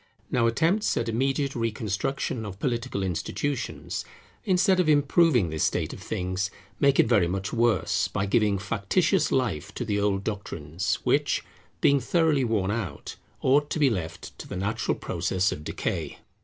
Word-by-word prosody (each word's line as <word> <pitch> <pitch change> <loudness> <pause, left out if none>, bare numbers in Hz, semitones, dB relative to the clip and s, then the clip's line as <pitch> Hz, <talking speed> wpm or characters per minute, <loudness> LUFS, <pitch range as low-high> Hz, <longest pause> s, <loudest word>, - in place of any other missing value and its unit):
Now 115 -2 +3
attempts 170 - +1
at 115 - -1
immediate 135 +4 0
reconstruction 115 +2 -2
of 100 -3 -7
political 120 -4 -2
institutions, 95 - -3 0.4
instead 190 0 +3
of 175 -4 +3
improving 145 - +4
this 80 - -1
state - - 0
of - - -10
things, 95 +2 -2 0.3
make 140 -1 +4
it - - +7
very 105 -7 +4
much 95 +2 -3
worse, 115 -4 +2
by 100 - -2
giving 105 -1 +2
factitious 115 - +1
life 100 - 0
to 120 - -3
the 105 -2 0
old 100 -1 +1
doctrines, 90 -5 -3
which, - - +1 0.4
being 140 0 +5
thoroughly 155 +1 +2
worn 105 -5 0
out, 100 -10 -4 0.3
ought 145 +3 +3
to - - -2
be 145 -4 +4
left 85 -5 -5
to - - -8
the - - -5
natural 105 +5 -1
process 95 +3 0
of 75 - -6
decay. - - -3
115 Hz, 155 wpm, -26 LUFS, 95-140 Hz, 0.4 s, it